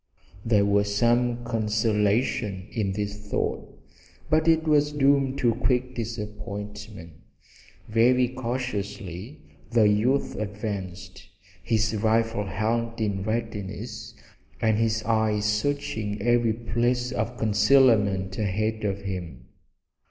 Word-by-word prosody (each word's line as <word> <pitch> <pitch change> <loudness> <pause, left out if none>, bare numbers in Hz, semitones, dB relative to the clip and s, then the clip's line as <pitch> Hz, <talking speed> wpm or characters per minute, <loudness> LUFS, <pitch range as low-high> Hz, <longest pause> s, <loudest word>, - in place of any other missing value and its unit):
There 105 -3 +3
was 100 0 +1
some 120 +1 +2
consolation 105 -2 0
in 100 -5 -1
this 105 0 -3
thought, 105 -1 -3 0.6
but 155 +1 +3
it 160 -1 +4
was 150 -1 +2
doomed 140 -1 +2
to 120 -3 +2
quick 125 +1 0
disappointment. 105 -5 -7 0.7
Very 125 +3 +4
cautiously 115 - -5 0.3
the 115 -2 +4
youth 115 +7 +1
advanced, 100 -3 -6 0.3
his 110 -1 0
rifle 115 0 +1
held 115 +3 -1
in 100 -3 -1
readiness 110 0 -4 0.4
and 110 -1 +2
his 110 -1 +1
eyes 110 -2 +1
searching 105 -2 -1
every 120 +1 +2
place 120 +2 -1
of 120 0 -3
concealment 105 -4 +3
ahead 110 +2 -1
of 100 -1 -1
him. 90 -7 -6
110 Hz, 105 wpm, -26 LUFS, 105-120 Hz, 0.7 s, it